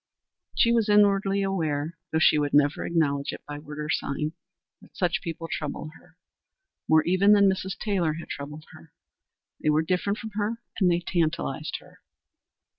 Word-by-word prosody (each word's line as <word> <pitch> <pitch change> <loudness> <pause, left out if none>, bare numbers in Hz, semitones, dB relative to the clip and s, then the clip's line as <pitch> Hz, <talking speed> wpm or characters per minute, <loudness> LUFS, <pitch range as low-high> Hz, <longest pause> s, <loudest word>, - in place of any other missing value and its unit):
She 235 - +4
was 230 -2 +2
inwardly 200 -1 +4
aware, 160 -4 -1 0.2
though 160 - +1
she 155 -1 +5
would 145 -1 0
never 145 0 +3
acknowledge 140 -4 0
it - - -10
by 145 0 -6
word 150 0 -10
or 150 0 -4
sign, 150 +2 -1 0.5
that - - -19
such 180 -1 0
people 165 -2 -5
troubled 155 0 -4
her. 175 0 -24 0.7
More 160 0 +5
even 185 +4 +4
than 200 -1 +6
Mrs. 190 0 -1
Taylor 185 -7 0
had 165 +2 -8
troubled 150 +2 -7
her. - - -16 0.7
They - - 0
were 155 +1 +3
different 185 +4 0
from 220 -2 -7
her 210 +2 -2 0.2
and 185 -3 +4
they 175 0 +2
tantalized 160 - -1
her. - - -19
170 Hz, 170 wpm, -26 LUFS, 150-195 Hz, 0.7 s, than